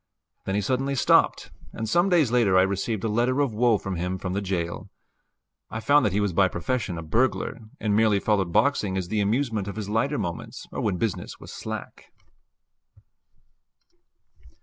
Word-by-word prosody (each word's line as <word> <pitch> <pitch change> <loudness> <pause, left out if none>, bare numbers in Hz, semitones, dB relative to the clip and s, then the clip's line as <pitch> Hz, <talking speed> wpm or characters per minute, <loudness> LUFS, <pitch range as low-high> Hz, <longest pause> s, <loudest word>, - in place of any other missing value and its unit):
Then 95 - -1
he 105 - +1
suddenly 130 +6 -1
stopped, 125 - +3 0.2
and 110 -1 -4
some 175 - +3
days 160 -10 +3
later 115 -7 +3
I 95 - +6
received 100 +2 -2
a - - +1
letter 120 +5 +1
of 140 -5 +1
woe 115 0 +3
from 95 -2 -5
him 90 +2 -2
from 90 -1 -4
the 100 - -1
jail. 90 0 -3 0.8
I 110 - -4
found 145 +2 +4
that - - -1
he 100 - 0
was 100 -3 0
by 95 +2 +4
profession 95 +1 -2
a 85 - -5
burglar, 115 +13 0 0.2
and 105 -2 0
merely 110 -2 +3
followed 100 -4 +1
boxing 105 -3 +2
as 90 -2 -3
the 105 0 0
amusement 110 -1 0
of 100 - -5
his 105 -2 -5
lighter 135 +7 0
moments, 85 -3 -5
or - - -4
when 100 -4 0
business 110 0 -3
was - - -10
slack. - - -7
105 Hz, 180 wpm, -25 LUFS, 95-120 Hz, 0.8 s, I